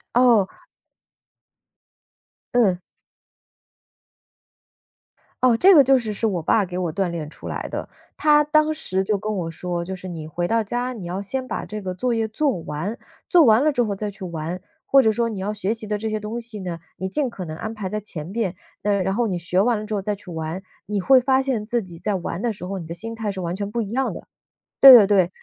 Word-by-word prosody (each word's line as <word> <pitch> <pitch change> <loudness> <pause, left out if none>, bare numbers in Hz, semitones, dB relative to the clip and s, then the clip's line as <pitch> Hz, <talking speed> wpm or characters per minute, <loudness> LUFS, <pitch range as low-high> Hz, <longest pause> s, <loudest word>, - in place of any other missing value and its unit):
哦。 235 -6 +5 2.1
嗯。 200 -7 +3 2.6
哦， 250 -3 +5
这 380 +8 +7
个 285 -3 +8
就 270 +1 +5
是 220 -3 -4
是 225 - -1
我 185 -6 -1
爸 200 +5 +3
给 180 0 -5
我 175 -3 -2
锻 195 0 0
炼 160 -3 -5
出 - - -10
来 - - -4
的。 - - -5 0.3
他 300 -1 +5
当 305 +1 +3
时 190 -11 -2
就 205 0 0
跟 215 +2 -3
我 165 -3 -3
说， 175 +1 -4
就 190 - -5
是 185 0 -8
你 160 -3 -6
回 175 +3 -3
到 230 0 +2
家 245 +4 -2
你 195 -7 -8
要 180 +3 -3
先 255 +6 -4
把 - - -4
这 210 0 -6
个 185 -1 -3
作 240 +6 -1
业 225 -1 0
做 255 - 0
完， 165 +9 -4 0.3
做 345 -3 +6
完 225 +1 +5
了 305 - +4
之 245 - +1
后 210 -4 -1
再 210 +1 -4
去 195 -1 -10
玩。 170 +1 -5 0.3
或 275 -1 +6
者 220 - +4
说 230 +2 0
你 210 -4 -5
要 205 +2 -2
学 210 +1 -2
习 220 -2 -8
的 210 0 -1
这 220 +1 -3
些 215 0 -2
东 215 +3 -5
西 230 -3 -6
呢， 175 -3 -5 0.2
你 190 - -3
尽 280 +6 0
可 195 -6 -7
能 155 -1 -6
安 220 +5 -5
排 205 -3 -4
在 215 - -3
前 170 -7 -6
面， 200 -2 -2 0.3
呃， 205 -1 +1
然 190 +1 0
后 235 +3 +1
你 185 -5 -2
学 180 +2 0
完 235 +3 +3
了 215 - -5
之 220 - -7
后 205 - 0
再 205 +2 -2
去 195 -2 -13
玩， 160 +3 -4 0.2
你 205 0 -1
会 260 +7 +6
发 265 +1 +2
现 250 -6 -2
自 235 +1 0
己 175 -3 -11
在 200 +4 -1
玩 175 0 -4
的 235 -1 0
时 190 -3 -9
候， 195 +1 -4
你 165 - -8
的 170 - -6
心 225 +7 -6
态 215 -2 -3
是 190 - -6
完 175 +1 -3
全 200 0 -3
不 235 0 -1
一 205 - -6
样 265 +3 -1
的。 - - -11 0.5
对 270 -1 +12
对 220 -5 +9
对， 190 -4 +3
210 Hz, 250 characters per minute, -22 LUFS, 185-235 Hz, 2.6 s, 对